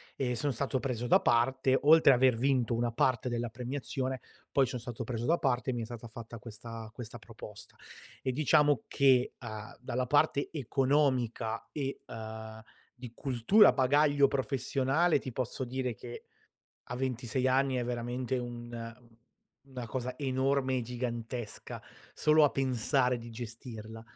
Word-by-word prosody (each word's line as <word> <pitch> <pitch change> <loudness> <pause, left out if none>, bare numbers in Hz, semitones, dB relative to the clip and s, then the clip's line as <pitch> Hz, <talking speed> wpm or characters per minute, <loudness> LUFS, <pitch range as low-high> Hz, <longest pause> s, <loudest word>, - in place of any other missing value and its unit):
E 125 -2 -1
sono 145 +4 0
stato 130 +2 -1
preso 125 -3 -3
da - - +6
parte, 130 +2 +2
oltre 155 -2 +7
aver 125 -2 +4
vinto 125 -2 +1
una 120 0 0
parte 125 +1 +1
della 120 -1 -2
premiazione, 130 +2 -4 0.3
poi 135 -2 +3
son 125 0 -4
stato 120 -1 -6
preso 120 0 -3
da 170 +2 +2
parte 130 -1 0
e - - -3
mi 120 - -2
è - - -3
stata 120 0 -8
fatta 115 +1 -9
questa 115 0 -9
questa 120 -1 -8
proposta. 110 -2 -12 0.5
E 130 - -1
diciamo 145 -1 +3
che, 130 -2 +3
uhm, 110 -2 -7
dalla 125 0 -2
parte 140 +1 +2
economica 130 -5 0
e, 140 -2 -4
uhm, 110 0 -8 0.3
di 125 -2 -9
cultura, 135 - +5
bagaglio 145 +1 +4
professionale, 135 +4 +1
ti 130 - -6
posso 130 +1 -3
dire 125 -1 -3
che, 120 -1 -9 0.6
a 120 - -6
26 130 0 -1
anni 135 +1 +2
è 120 - -1
veramente 125 +1 -2
un 120 -1 -6 0.7
una 125 -3 -6
cosa 125 +2 -4
enorme 130 -1 +1
e - - -1
gigantesca, 120 -1 -5 0.3
solo 155 0 +5
a 145 - +4
pensare 125 -1 +1
di 115 0 -9
gestirla; 115 -1 -8
125 Hz, 150 wpm, -31 LUFS, 115-135 Hz, 0.7 s, oltre